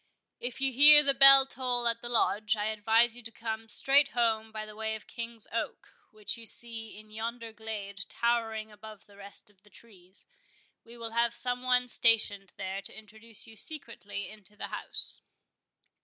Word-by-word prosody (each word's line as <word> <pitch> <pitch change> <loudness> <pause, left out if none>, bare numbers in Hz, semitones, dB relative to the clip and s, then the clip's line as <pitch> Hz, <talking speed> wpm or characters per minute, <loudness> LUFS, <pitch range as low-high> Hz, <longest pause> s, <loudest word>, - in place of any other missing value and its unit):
If 245 0 -5
you 270 -1 +2
hear 295 +3 +9
the 275 -1 +2
bell 275 0 +9
toll 250 -2 -1
at 230 0 0
the 240 - -6
Lodge, 215 -2 0
I 210 - -3
advise 220 +2 +1
you 245 - -9
to 225 -1 -11
come 225 -1 -7
straight 275 +5 +5
home 225 -2 -1
by 215 -1 -7
the 215 0 -13
way 220 0 -4
of 220 - -10
the - - -19
King's 230 -2 -4
Oak, 230 +1 -6 0.2
which 215 +2 -7
you 230 -1 -11
see 225 -1 -7
in 215 0 -15
yonder 230 +1 -7
glade 205 -2 -7
towering 225 -2 -2
above 210 0 -14
the 205 - -21
rest 200 +1 -12
of 195 -2 -35
the 210 - -23
trees. 190 -4 -4 0.6
We 235 +1 -15
will 230 -1 -5
have 235 +1 0
some 245 0 -3
one 250 0 +1
stationed 215 -5 +1
there 190 0 -5
to 195 - -6
introduce 220 +1 -8
you 225 - -12
secretly 220 - -5
into 210 -1 -13
the - - -7
house." - - +1
225 Hz, 185 wpm, -28 LUFS, 215-240 Hz, 0.6 s, hear